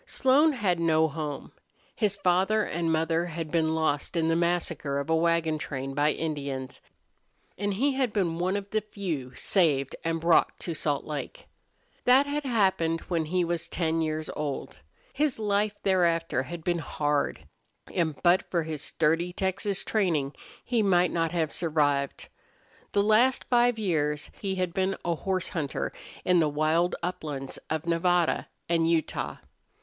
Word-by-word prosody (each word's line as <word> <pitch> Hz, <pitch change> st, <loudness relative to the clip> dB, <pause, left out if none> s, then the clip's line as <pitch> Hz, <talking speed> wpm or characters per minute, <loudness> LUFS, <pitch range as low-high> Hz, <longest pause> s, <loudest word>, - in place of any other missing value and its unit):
Slone 285 Hz, +4 st, +4 dB
had 195 Hz, -9 st, 0 dB
no 160 Hz, -1 st, +3 dB
home. 150 Hz, -2 st, -5 dB, 0.4 s
His 205 Hz, -3 st, +1 dB
father 195 Hz, +3 st, +2 dB
and 165 Hz, -3 st, -1 dB
mother 165 Hz, +1 st, +1 dB
had 165 Hz, -2 st, -5 dB
been 160 Hz, -1 st, +1 dB
lost 160 Hz, +1 st, -1 dB
in 165 Hz, -1 st, +2 dB
the 165 Hz, -, +3 dB
massacre 170 Hz, -4 st, 0 dB
of 140 Hz, +3 st, -2 dB
a -, -, +5 dB
wagon 165 Hz, -1 st, +1 dB
train 135 Hz, -2 st, -4 dB
by 145 Hz, +2 st, +2 dB
Indians, 140 Hz, -5 st, -4 dB, 0.7 s
and 205 Hz, 0 st, -2 dB
he 275 Hz, +7 st, +2 dB
had 260 Hz, -3 st, 0 dB
been 175 Hz, -6 st, 0 dB
one 185 Hz, +3 st, +1 dB
of 200 Hz, -1 st, -5 dB
the 215 Hz, -, +1 dB
few 175 Hz, -11 st, -5 dB
saved 145 Hz, -8 st, +1 dB
and 165 Hz, 0 st, -1 dB
brought 165 Hz, +1 st, +3 dB
to 170 Hz, -, -3 dB
Salt 145 Hz, -2 st, -1 dB
Lake. 150 Hz, -2 st, -6 dB, 0.6 s
That 260 Hz, +3 st, +6 dB
had 290 Hz, 0 st, -3 dB
happened 190 Hz, -9 st, +1 dB
when 165 Hz, -3 st, 0 dB
he 180 Hz, +3 st, +1 dB
was 170 Hz, 0 st, -2 dB
ten 165 Hz, -1 st, 0 dB
years 155 Hz, 0 st, -2 dB
old. 145 Hz, -, -4 dB, 0.3 s
His 295 Hz, -1 st, +1 dB
life 210 Hz, -1 st, 0 dB
thereafter 170 Hz, -7 st, +2 dB
had 165 Hz, +5 st, -7 dB
been 175 Hz, 0 st, 0 dB
hard, 145 Hz, -2 st, -1 dB, 0.5 s
and 160 Hz, -4 st, 0 dB
but 175 Hz, +1 st, +4 dB
for 170 Hz, -2 st, 0 dB
his 155 Hz, -2 st, -5 dB
sturdy 165 Hz, +4 st, +1 dB
Texas 190 Hz, +2 st, -1 dB
training 165 Hz, -10 st, 0 dB, 0.3 s
he 240 Hz, -2 st, +1 dB
might 180 Hz, -3 st, +3 dB
not 165 Hz, -1 st, 0 dB
have 165 Hz, -3 st, 0 dB
survived. 145 Hz, -4 st, 0 dB, 0.7 s
The 200 Hz, -, +3 dB
last 230 Hz, +5 st, +4 dB
five 240 Hz, -1 st, +4 dB
years 150 Hz, -8 st, -1 dB
he 195 Hz, -2 st, -1 dB
had 185 Hz, -2 st, -1 dB
been 190 Hz, +1 st, 0 dB
a 170 Hz, -, +1 dB
horse 185 Hz, +2 st, -2 dB
hunter 150 Hz, -5 st, -3 dB, 0.3 s
in 180 Hz, -1 st, +4 dB
the 155 Hz, -2 st, +3 dB
wild 155 Hz, +4 st, +1 dB
uplands 150 Hz, -6 st, -4 dB
of 160 Hz, +1 st, -2 dB
Nevada 170 Hz, 0 st, +1 dB, 0.2 s
and 165 Hz, -1 st, +2 dB
Utah. 165 Hz, -2 st, -1 dB
170 Hz, 160 wpm, -27 LUFS, 155-190 Hz, 0.7 s, That